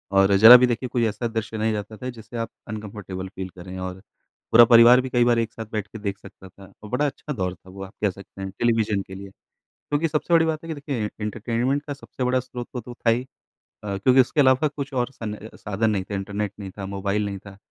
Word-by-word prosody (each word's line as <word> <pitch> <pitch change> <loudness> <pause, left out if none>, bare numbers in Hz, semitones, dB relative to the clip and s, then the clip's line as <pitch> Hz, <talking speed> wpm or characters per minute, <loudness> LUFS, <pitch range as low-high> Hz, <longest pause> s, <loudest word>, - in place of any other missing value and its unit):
और 95 0 +5
ज़रा 115 +4 +11
भी 125 0 +4
देखिए 120 +1 -2
कोई 120 -3 +1
ऐसा 115 +3 -2
दृश्य 110 -1 -4
नहीं 110 0 0
रहता 105 +1 -5
था 125 - -5
जिससे 115 0 -9
आप 115 0 -3 0.2
अनकम्फर्टेबल 105 -3 -6
फ़ील 95 -1 -7
करें। 90 +1 -10
और 95 0 -6 0.5
पूरा 120 +1 +9
परिवार 120 +2 +7
भी 130 - -5
कई 120 -1 +3
बार 120 -1 +3
एक 115 -1 -2
साथ 115 - -7
बैठ 105 -1 -3
के 110 +2 -10
देख 100 -1 -3
सकता 95 -1 -14
था 95 +1 -16
और 105 - -9
बड़ा 125 +6 +1
अच्छा 145 +1 -4
दौर 90 -6 -2
था 95 - -19
वो 95 +1 -8
आप 95 - -10
कह 105 - +3
सकते 100 +1 -11
हैं 95 - -4
टेलीविज़न 110 -4 +1
के 95 - -9
लिए। 100 0 -9 0.4
क्योंकि 145 +3 -2
सबसे 155 +3 0
बड़ी 165 - +5
बात 160 0 -2
है 165 - -9
कि 160 - -3
देखिए 140 -7 -3
एंटरटेनमेंट 120 +6 -1
का 145 - -4
सबसे 135 -2 -6
बड़ा 130 +1 +2
स्रोत 125 -1 -8
तो 125 - -4
तो 120 +2 -10
था 120 -1 +1
ही 120 +2 +1 0.6
अ, 100 -2 -3
क्योंकि 130 +6 +5
उसके 130 - -1
अलावा 130 +3 +4
कुछ 145 -1 -6
और 125 0 -1
सन 110 -4 -6
अ, 105 +1 -11
साधन 105 +2 -1
नहीं 100 -3 0
थे। - - -5
इंटरनेट 100 +1 -3
नहीं 95 -2 -7
था, 100 - -5
मोबाइल 100 +1 -2
नहीं 100 -1 -4
था 100 -1 -11
110 Hz, 250 wpm, -24 LUFS, 100-125 Hz, 0.6 s, ज़रा